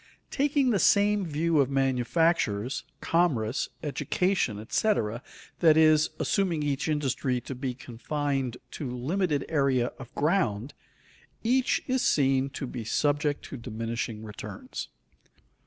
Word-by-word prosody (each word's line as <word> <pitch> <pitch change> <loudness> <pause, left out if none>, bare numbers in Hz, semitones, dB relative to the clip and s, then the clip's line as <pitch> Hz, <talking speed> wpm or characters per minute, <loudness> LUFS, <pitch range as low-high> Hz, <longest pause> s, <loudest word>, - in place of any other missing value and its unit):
Taking 280 -2 +2
the 205 - +2
same 205 -1 +3
view 160 +1 +1
of 135 -2 +3
manufactures, 135 -3 +1 0.2
commerce, 145 -8 +1
education, 150 - 0
etc., 115 - 0 0.4
that 160 -3 +5
is, 155 -1 +5
assuming 175 -6 0
each 145 +1 -1
industry 135 -4 0
to 135 - -6
be 130 -1 -4
confined 130 +1 -3
to 140 - -5
limited 145 +4 -1
area 135 -5 +1
of 130 -3 -10
ground, 145 - 0 0.7
each 255 +3 +2
is 260 -1 0
seen 135 -1 +2
to 135 - -5
be 120 -2 -6
subject 145 +5 0
to 140 - -7
diminishing 115 -1 -4
returns. 180 - -7
140 Hz, 120 wpm, -28 LUFS, 125-170 Hz, 0.7 s, that